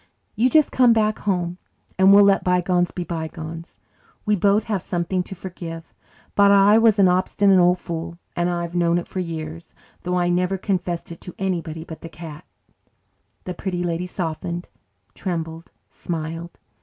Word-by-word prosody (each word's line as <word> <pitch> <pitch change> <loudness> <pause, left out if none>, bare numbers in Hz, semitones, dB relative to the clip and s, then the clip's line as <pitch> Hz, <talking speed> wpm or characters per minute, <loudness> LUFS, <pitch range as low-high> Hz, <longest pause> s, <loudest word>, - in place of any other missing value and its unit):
You 245 +3 +3
just 310 +1 +4
come 250 -2 +5
back 215 -1 +1
home 180 -3 -1 0.4
and 190 +1 +7
we'll 200 +1 +8
let 200 -1 +4
bygones 180 -1 +2
be 180 - -5
bygones. 165 0 -6 0.5
We 210 -1 +3
both 200 +2 +3
have 210 -5 -2
something 175 +1 -1
to 190 - -8
forgive, 170 -3 -8 0.4
but 200 0 +5
I 200 +2 +6
was 225 -2 +4
an 195 -2 +6
obstinate 185 +1 +3
old 180 0 +4
fool 170 -1 -6 0.2
and 175 0 +1
I've 170 -1 -3
known 170 -1 +2
it 175 - -3
for 185 - -5
years, 165 -1 -6 0.3
though 180 0 -1
I 175 -1 +1
never 180 +2 +1
confessed 180 -3 -2
it 165 - -10
to 180 - -10
anybody 170 -4 -3
but 160 -1 -10
the 165 - -8
cat." 160 -2 -10 1.0
The 180 - -5
Pretty 180 0 -3
Lady 175 +1 -2
softened, 170 0 -4 0.4
trembled, 165 -3 -5 0.2
smiled. 165 0 -5
175 Hz, 165 wpm, -22 LUFS, 170-195 Hz, 1.0 s, we'll